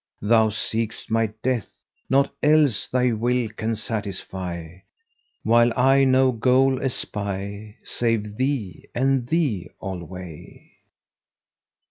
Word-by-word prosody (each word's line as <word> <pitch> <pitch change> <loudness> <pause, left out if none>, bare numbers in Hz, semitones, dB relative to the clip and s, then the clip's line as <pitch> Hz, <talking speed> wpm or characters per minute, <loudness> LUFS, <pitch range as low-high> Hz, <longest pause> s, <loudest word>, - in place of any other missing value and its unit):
Thou 110 +1 +4
seekst 110 +1 -3
my 115 0 +2 0.2
death; 125 -4 0 0.4
naught 140 +1 +3
else 150 -7 +3
thy 125 -1 +1
will 120 +2 0
can 110 +1 -3
satisfy 95 -6 -4 0.3
* 465 - -46
While 120 +1 +4
I 135 +2 +5
no 130 0 +4
goal 130 +2 +3
espy 100 -3 -4
save 110 -3 -1
thee 125 - -2
and 130 -1 +1
thee 125 - 0
alway. 90 -3 -8
115 Hz, 105 wpm, -23 LUFS, 100-130 Hz, 0.4 s, I